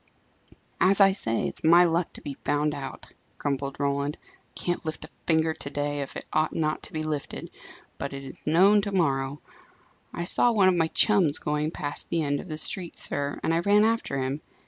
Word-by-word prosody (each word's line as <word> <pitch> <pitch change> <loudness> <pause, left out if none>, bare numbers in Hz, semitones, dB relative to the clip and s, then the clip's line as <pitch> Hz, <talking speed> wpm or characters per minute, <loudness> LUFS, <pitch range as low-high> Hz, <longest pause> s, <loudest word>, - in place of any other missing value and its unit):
"As 195 +2 +4
I 195 -1 +7
say, 115 - 0
it's - - -7
my 170 +2 +7
luck 170 0 +1
to - - -10
be 145 - -5
found 150 +1 +1
out!" 135 -2 -7 0.3
grumbled 140 -1 -3
Roland. 140 +1 -1
"I - - -24 0.3
can't 175 0 -2
lift 155 -1 -5
a - - -17 0.2
finger 160 -1 +2
to 140 - -7
day, 145 0 -2
if 140 - -6
it - - -6
ought 155 - +1
not 155 -1 -1
to - - -7
be 155 -1 -2
lifted, 150 -2 -4 0.5
but 140 - -4
it 135 0 -7
is 135 - -10
known 190 +7 +5
to 200 0 -3
morrow. 140 -6 0 0.7
I 170 - -4
saw 240 +7 +4
one 195 -4 +5
of 185 - +2
my 165 -2 +2
chums 180 -4 +3
going 150 +1 -1
past 145 -3 -4
the 165 -1 0
end 145 -1 0
of - - -8
the 155 -3 -5
street, 175 +2 0
sir, 145 0 -1
and 165 - +1
I 165 - +2
ran 205 +4 +4
after 225 -11 0
him. 135 +3 -2
155 Hz, 210 wpm, -26 LUFS, 145-175 Hz, 0.7 s, I